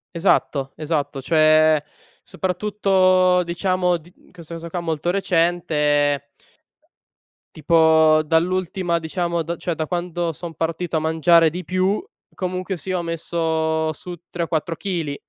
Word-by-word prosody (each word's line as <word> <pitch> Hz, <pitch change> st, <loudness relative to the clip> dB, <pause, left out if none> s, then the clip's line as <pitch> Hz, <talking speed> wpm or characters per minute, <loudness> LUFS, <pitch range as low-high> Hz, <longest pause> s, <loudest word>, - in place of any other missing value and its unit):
Esatto, 145 Hz, -6 st, +1 dB
esatto. 145 Hz, -3 st, -3 dB
Cioè 155 Hz, 0 st, +4 dB, 0.4 s
soprattutto 185 Hz, -1 st, +2 dB
diciamo 180 Hz, +1 st, 0 dB
di 170 Hz, +2 st, -19 dB
in -, -, -25 dB
questo 170 Hz, -2 st, -11 dB
caso 165 Hz, 0 st, -7 dB
qua, 175 Hz, -, -3 dB
molto 165 Hz, -1 st, -2 dB
recente 155 Hz, -6 st, +1 dB, 1.3 s
tipo 160 Hz, 0 st, +4 dB
dall'ultima 175 Hz, +2 st, 0 dB
diciamo 170 Hz, +1 st, -2 dB
da 170 Hz, +2 st, -4 dB
cioè 175 Hz, -, -3 dB
da 155 Hz, -, -2 dB
quando 175 Hz, 0 st, -3 dB
son 165 Hz, +1 st, -8 dB
partito 165 Hz, +1 st, -2 dB
a -, -, +1 dB
mangiare 160 Hz, +1 st, +4 dB
di 180 Hz, +3 st, -6 dB
più, 185 Hz, -, 0 dB, 0.3 s
comunque 185 Hz, 0 st, -4 dB
sia 185 Hz, +3 st, -3 dB
ho 175 Hz, -, -3 dB
messo 160 Hz, -1 st, -1 dB
su 175 Hz, +4 st, -8 dB, 0.2 s
3 175 Hz, -, -4 dB
o -, -, -3 dB
4 165 Hz, +1 st, -2 dB
chili 165 Hz, -6 st, -3 dB
170 Hz, 135 wpm, -21 LUFS, 160-180 Hz, 1.3 s, Cioè